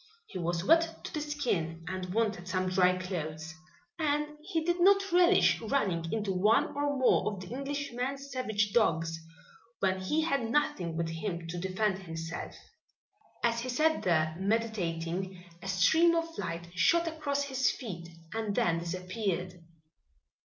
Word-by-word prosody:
He 185 - -7
was 170 0 -1
wet 330 - +3
to - - -7
the 305 - -2
skin 185 - -2
and 185 -1 -4
wanted 210 -4 0
some 185 0 0
dry 185 0 +3
clothes, 160 -4 -5 0.5
and 300 -1 +1
he 325 0 -2
did 350 +1 +1
not 395 +1 +5
relish 355 +2 +5
running 190 -9 0
into 210 -3 -1
one 210 +5 +3
or 285 0 0
more 255 -4 +3
of 200 - -7
the 185 - -9
Englishman's 275 0 -4
savage 215 -6 0
dogs, 165 -7 +2 0.6
when 190 -1 +1
he 300 +12 +1
had 275 -8 0
nothing 225 - 0
with 165 -1 -1
which 170 0 -4
to 175 - -4
defend 190 +2 0
himself. 165 -2 -6 0.9
As 235 0 +2
he 250 +2 -4
sat 315 +5 +2
there 160 -3 +2
meditating, 190 -4 -1 0.2
a 195 - -7
stream 320 - +4
of 330 0 -2
light 170 - -4
shot 335 - +3
across 290 -3 -1
his 265 -2 +1
feet 175 -9 -6 0.2
and 220 -2 -2
then 170 -1 +2
disappeared. 185 +1 -3
205 Hz, 150 wpm, -30 LUFS, 175-280 Hz, 0.9 s, not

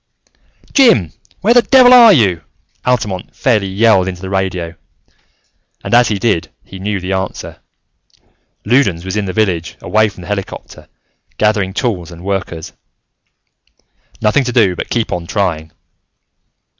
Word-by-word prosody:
"Jim, 120 - +4 0.3
where 220 +5 +3
the 245 - +6
devil 255 0 +6
are 235 -3 +8
you?" 100 - +2 0.5
Altamont 105 -7 -2
fairly 110 -8 +1
yelled 95 -1 +2
into 90 -2 -5
the 95 - -6
radio; 90 -3 -2 1.1
and - - -4
as 120 +1 +5
he 105 - -1
did, 95 -5 -1
he 95 - -12
knew 100 +1 -3
the 90 +1 -5
answer. 95 0 -5 1.1
Loudons 100 -8 +1
was 95 +1 -4
in 105 -1 -1
the 95 - -3
village, 90 -6 -1
away 110 0 +1
from 95 - -14
the 85 - -11
helicopter, 100 -2 -7 0.5
gathering 105 -3 +1
tools 95 -5 -3
and 85 +1 -12
workers. 95 -4 -4 1.5
Nothing 105 +6 +2
to 125 - -2
do 105 -7 +2
but - - -6
keep 115 -2 -2
on 90 -2 -4
trying! 85 -6 -2
100 Hz, 145 wpm, -15 LUFS, 90-115 Hz, 1.5 s, are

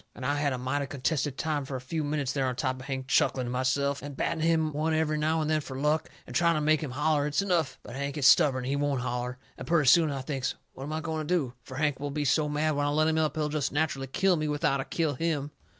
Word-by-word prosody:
And 130 - -7
I 145 - +1
had 145 -1 +1
a 130 - -2
mighty 135 +3 -2
contented 140 0 -1
time 155 -3 -1
fur 135 0 -6
a - - -3
few 155 +5 -3
minutes 145 -3 -1
there 135 -2 0
on 125 - -2
top 130 0 -2
of 130 - -9
Hank, 130 -1 -4
chuckling 130 -1 +2
to 120 - -4
myself, 130 +2 0
and 140 -1 -8
batting 160 - -1
him 160 -2 +2
one 155 +2 0
every 155 -1 +1
now 160 +1 +1
and 155 - -1
then 155 0 +1
fur 135 -2 -8
luck, 150 +2 +1 0.2
and - - -10
trying 170 -1 +4
to - - +1
make 155 0 +3
him 150 - -3
holler 150 +2 +1
it's 150 +5 0
enough. 175 -7 0
But 120 - -9
Hank 140 +1 -3
is 140 - 0
stubborn 130 -2 +5
and - - -5
he - - +1
won't 140 -2 0
holler. 125 0 -3 0.2
And - - -7
purty 165 -3 +3
soon 160 +4 +6
I 140 -2 -3
thinks, 135 -1 -3 0.2
what 135 - -7
am 150 - -5
I 160 - -2
going 160 -1 -3
to - - -4
do? 135 -8 -1
Fur 130 - -10
Hank 145 -1 0
will 145 0 -3
be 145 +1 -2
so 150 +2 +2
mad 150 +1 +1
when 145 0 +1
I - - +1
let 155 +2 +2
him 160 0 +1
up 155 -2 0
he'll 150 -1 0
jest 150 -2 -1
natcherally 140 -3 -1
kill 190 +2 +3
me, 155 0 -1
without 145 -2 +1
I - - -6
kill 160 -4 0
him. 150 0 -2
145 Hz, 290 wpm, -28 LUFS, 135-155 Hz, 0.2 s, soon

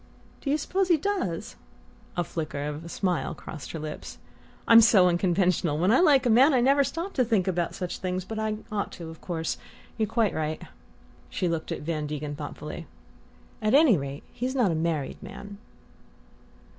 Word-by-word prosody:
"Do 280 - -3
you 290 - +3
suppose 375 +5 0
he 345 -3 +5
does?" 400 +4 -2 0.6
A 175 - +2
flicker 155 -4 -4
of 150 +1 -5
a 170 - -9
smile 180 -1 -1
crossed 150 -6 -8
her - - -3
lips. 155 -1 -7 0.5
"I'm 230 0 +9
so 200 -5 +6
unconventional: 175 -3 +2
when 180 +6 +3
I 250 - +5
like 290 -7 +5
a - - +3
man 265 +6 +6
I - - +4
never 275 +3 +4
stop 335 +8 -4
to 255 - +3
think 220 -6 +1
about 175 -2 -1
such 180 -1 -4
things. 185 0 -2
But 220 +2 -5
I 215 0 -1 0.2
ought 205 -1 -2
to, 165 -2 -8
of 160 - -13
course 165 -3 -3 0.4
you're 220 - +2
quite 225 -1 +1
right." 155 0 -3 0.7
She 180 - -1
looked 165 -2 -2
at - - -3
Van 155 -1 -2
Degen 150 0 -4
thoughtfully. 150 +2 -7 0.7
"At 215 +3 +3
any 290 -7 +7
rate, 140 -2 -5
he's 255 +2 -3
not 235 -9 +3
a - - 0
married 160 -3 -2
man." 200 0 -9
185 Hz, 185 wpm, -27 LUFS, 160-240 Hz, 0.7 s, I'm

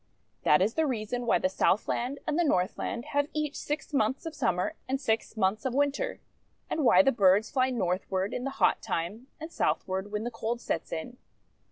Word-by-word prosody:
That 150 +5 +5
is 215 +3 0
the 320 +1 +1
reason 240 0 -3
why - - +4
the - - +1
Southland 235 +7 0
and 305 +3 0
the - - +4
Northland 225 - 0
have 285 0 +2
each 305 -1 -2
six 295 +1 -4
months 265 +3 +1
of 325 - -4
Summer 180 - 0 0.2
and 265 +1 0
six 225 -3 -1
months 195 +1 +1
of 260 -1 -2
Winter, 285 - 0 0.5
and 315 - 0
why 240 +2 +7
the 270 - +4
birds 200 -1 +4
fly 260 -1 +2
Northward 190 -3 -1
in 250 - -3
the 275 - -1
hot - - +3
time, 200 +10 -3
and 320 +1 -7
Southward 190 - -1
when 210 +1 -2
the 240 - -3
cold 230 +1 -3
sets - - -3
in. 165 +10 -5
235 Hz, 195 wpm, -29 LUFS, 195-280 Hz, 0.5 s, why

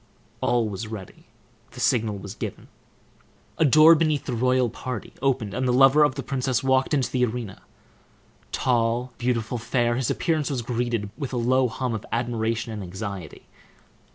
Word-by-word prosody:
All 120 -2 +2
was 105 +2 -5
ready. 105 -4 -9 0.5
The - - -10
signal 110 -3 +1
was 100 0 -8
given. - - -7 0.9
A 160 - +5
door 155 +4 +8
beneath 155 -2 +1
the 125 - -3
royal 125 +1 +2
party 120 0 -6
opened, 125 -7 0
and 130 +3 -1
the - - +3
lover 135 +4 +6
of 145 -3 +2
the 135 - -4
princess 130 -2 -1
walked 130 +2 +2
into 135 -3 0
the 125 -1 +1
arena. 115 -4 -3 0.9
Tall, 120 0 0
beautiful, 120 -1 -1
fair, 120 0 0
his 130 -2 -1
appearance 160 -4 0
was 130 -4 -2
greeted 120 -3 -2
with 140 -2 -4
a - - -1
low 130 +2 +3
hum 125 +1 -3
of 110 - -4
admiration 115 -1 -1
and 105 - -5
anxiety. 95 -2 -7
120 Hz, 165 wpm, -25 LUFS, 115-130 Hz, 0.9 s, door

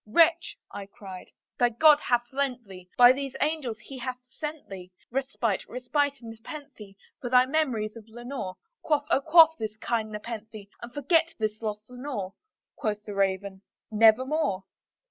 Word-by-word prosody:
"Wretch," 330 +8 +3
I 200 -1 -7
cried, 190 -2 -10 0.3
"thy 245 - +5
God 295 +5 +6
hath 240 -4 +1
lent 260 -4 -2
thee 185 -2 -12
by 245 0 +9
these 270 0 -3
angels 295 -7 -1
He 265 +3 -10
hath 255 0 -4
sent 300 +4 -7
thee 185 -2 -9 0.2
Respite 245 -5 -1
respite 275 +3 -1
and 230 -1 -8
nepenthe 225 -3 -10 0.2
from 250 -5 -5
thy 250 0 +6
memories 255 -7 0
of 225 -2 -11
Lenore! 240 -4 -6 0.2
Quaff, 295 -2 +1
oh, 275 - +4
quaff 320 +2 +7
this 215 -1 -4
kind 220 -1 -2
nepenthe, 215 -1 -7
and 240 - -8
forget 325 +5 +2
this 215 0 -2
lost 215 -1 -4
Lenore!" 245 -7 -5 0.4
Quoth 210 -5 -3
the 210 - -6
Raven, 195 0 -1 0.3
"Nevermore." 220 -1 +3
240 Hz, 155 wpm, -27 LUFS, 210-280 Hz, 0.4 s, by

